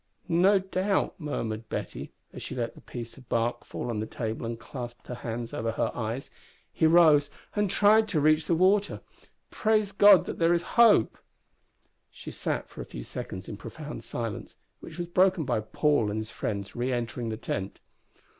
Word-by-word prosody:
"No 185 +4 +4
doubt," 190 +1 0
murmured 115 -8 -4
Betty, - - -5 0.2
as - - -8
she - - -6
let 115 -2 -2
the - - -15
piece 120 0 -8
of 125 - -19
bark 115 +1 0
fall - - -6
on 110 - -2
the 110 - -3
table 115 0 -4
and 115 0 -5
clasped 120 -1 -8
her - - -6
hands 120 -1 -5
over 115 0 -2
her - - 0
eyes, 115 +4 -4 0.4
"he 160 - +3
rose 155 -4 +6 0.3
and 205 -2 +1
tried 215 +3 +5
to 170 -6 +1
reach 155 +1 +3
the 170 - +3
water. 195 +4 +2 0.5
Praise 215 -2 +1
God 200 -1 +7
that - - -6
there 170 +1 +4
is 170 - -1
hope!" 225 - +5 0.9
She - - -10
sat - - -3
for - - -9
a - - -6
few - - -8
seconds 95 +8 -7
in 105 - -6
profound 150 +8 -8
silence, 115 -3 -5 0.2
which 160 - -11
was 175 - -2
broken 185 -1 +3
by 120 -4 0
Paul 145 0 +1
and 105 - -3
his 110 0 -6
friends 100 -2 -4
re 125 +2 -1
entering 120 -1 -3
the 110 - -4
tent. 95 -3 -4
140 Hz, 185 wpm, -28 LUFS, 115-180 Hz, 0.9 s, God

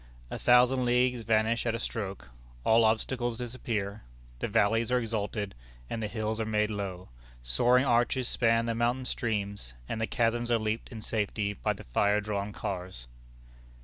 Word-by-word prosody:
A - - -4
thousand 125 +1 +5
leagues 125 0 +2
vanish 115 +1 +1
at 115 - +1
a - - -1
stroke. 100 - -4 0.3
All 115 - +5
obstacles 120 +2 0
disappear. 115 -4 -3 0.4
The - - -1
valleys 115 +3 +2
are 125 - +4
exalted, 105 -3 -2 0.4
and 115 - -2
the 110 - -1
hills 110 0 -2
are - - -1
made 105 0 +1
low, 95 -3 -5 0.3
soaring 120 - +3
arches 120 +1 +2
span 115 -2 +2
the 115 - 0
mountain 120 +3 0
streams, 100 - -3
and 110 - -3
the 110 - 0
chasms 120 0 0
are 120 - +4
leaped 110 +1 -2
in 110 -2 -8
safety 105 -1 -1
by - - -1
the - - -11
fire 100 +12 +2
drawn 105 -1 -3
cars. 90 -11 -5
110 Hz, 165 wpm, -29 LUFS, 105-120 Hz, 0.4 s, thousand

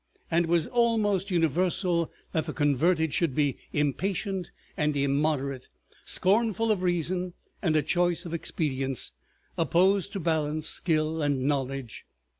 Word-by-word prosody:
And 170 +1 +3
it - - -7
was 170 -2 +3
almost 215 -5 +1
universal 175 0 +1 0.2
that 160 0 -1
the 155 - -3
converted 160 +2 +2
should 165 -7 0
be 145 -3 +1
impatient 185 +5 -1 0.3
and 150 -2 0
immoderate, 140 -1 0 0.4
scornful 225 +3 +2
of 200 -4 0
reason 180 0 0 0.3
and 160 -5 +1
a 155 - +3
choice 175 +3 +1
of 170 - -6
expedients, 135 -6 -2 0.5
opposed 185 +5 +3
to 195 - -3
balance, 155 -2 0
skill, 160 -1 +1
and 140 -3 0
knowledge. 135 -3 -2
165 Hz, 130 wpm, -27 LUFS, 145-185 Hz, 0.5 s, And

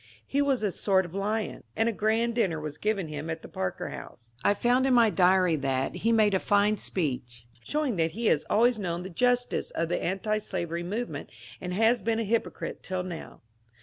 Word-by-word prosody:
He 280 - 0
was 275 -5 +1
a 205 - +1
sort 190 0 +2
of 175 - -10
lion, 210 +3 -2
and' 225 +1 +3
a - - +3
grand 225 +2 +1
dinner 190 -9 +1
was 150 0 -6
given 205 -5 0
him 150 +1 -5
at 160 0 -4
the - - -8
Parker 95 -1 -3
House. 115 0 -10
I 205 - +4
find 245 +5 +2
in 260 - +4
my 230 -3 +5
diary 185 -2 +4
that 135 -1 -1
^^he 230 - 0
made 215 -3 +4
a 190 - +3
fine 205 +2 +3
speech, 125 -11 -3 0.2
showing 295 -8 -1
thatr 165 -1 +2
he 230 +8 -5
has 155 -8 +3
always 235 +1 +3
known 175 -2 -2
the 190 - -7
justice 245 +6 +1
of 165 0 -2
the 175 - -1
antislavery 190 -3 -2
movement 210 +8 -4 0.3
and 180 - -4
has 225 +4 +3
been 225 -1 0
a 230 - 0
hypocrite 225 +2 -2
till 185 -1 -3
now." 175 -3 -8
200 Hz, 205 wpm, -28 LUFS, 170-225 Hz, 0.3 s, my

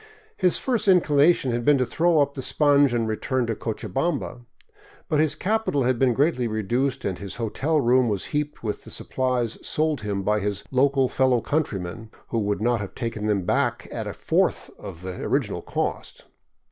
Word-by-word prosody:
His 180 -3 +2
first 240 -5 -1
inclination 155 -6 +4
had 120 0 -1
been 145 +3 +5
to 130 - +1
throw 165 +3 +2
up 140 0 0
the 135 - -5
sponge 145 0 +3
and 115 -2 0
return 125 +3 -1
to 115 - -1
Cochabamba. 135 +5 -3 0.7
But 155 -4 +1
his 155 -1 +2
capital 210 -9 0
had 125 -1 +1
been 125 -3 +3
greatly 140 -4 +1
reduced 120 +5 -1
and 95 -3 -2
his 100 -2 -7
hotel 135 +7 0
room 125 -1 +3
was 100 -3 -2
heaped 150 -2 -2
with 105 -2 -3
the - - -11
supplies 125 -3 -2
sold 155 -1 -1
him 100 -2 -3
by 105 +2 +1
his 100 -1 -2
local 135 0 +3
fellow 130 -1 +2
coun 155 +7 +1
trymen, 100 +2 -7 0.2
who 115 - 0
would 105 0 -1
not 120 -2 +1
have 100 - -7
taken 115 -3 -3
them 100 -4 0
back - - 0
at - - -4
a - - -4
fourth - - 0
of 95 -4 -9
the 95 -1 -6
original - - -1
cost. - - -4
125 Hz, 185 wpm, -24 LUFS, 110-145 Hz, 0.7 s, been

